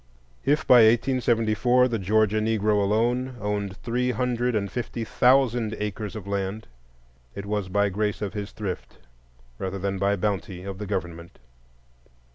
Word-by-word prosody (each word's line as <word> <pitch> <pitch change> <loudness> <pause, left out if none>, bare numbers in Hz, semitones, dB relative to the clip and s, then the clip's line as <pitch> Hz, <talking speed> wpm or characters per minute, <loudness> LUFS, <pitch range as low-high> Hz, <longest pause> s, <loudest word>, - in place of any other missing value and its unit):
If 145 +3 +1
by 125 - +7
1874 120 0 +3
the 115 -3 -2
Georgia 110 +2 +2
Negro 105 -1 +1
alone 120 +5 0
owned 105 -1 -3
three 125 +3 -1
hundred 125 0 0
and 100 -2 -1
fifty 120 -1 -4
thousand 120 -2 +2
acres 105 -1 -4
of 105 -4 -7
land, 100 +2 -3 0.7
it 100 - -6
was 100 -2 -2
by 100 +1 +2
grace 105 +1 -1
of 105 -2 -4
his 105 -1 -5
thrift 100 -4 -6 0.6
rather 95 +1 -3
than 95 0 -2
by 100 +1 +2
bounty 95 -2 -3
of 95 0 -6
the 105 - -5
government. 85 -3 -5
105 Hz, 145 wpm, -25 LUFS, 100-120 Hz, 0.7 s, by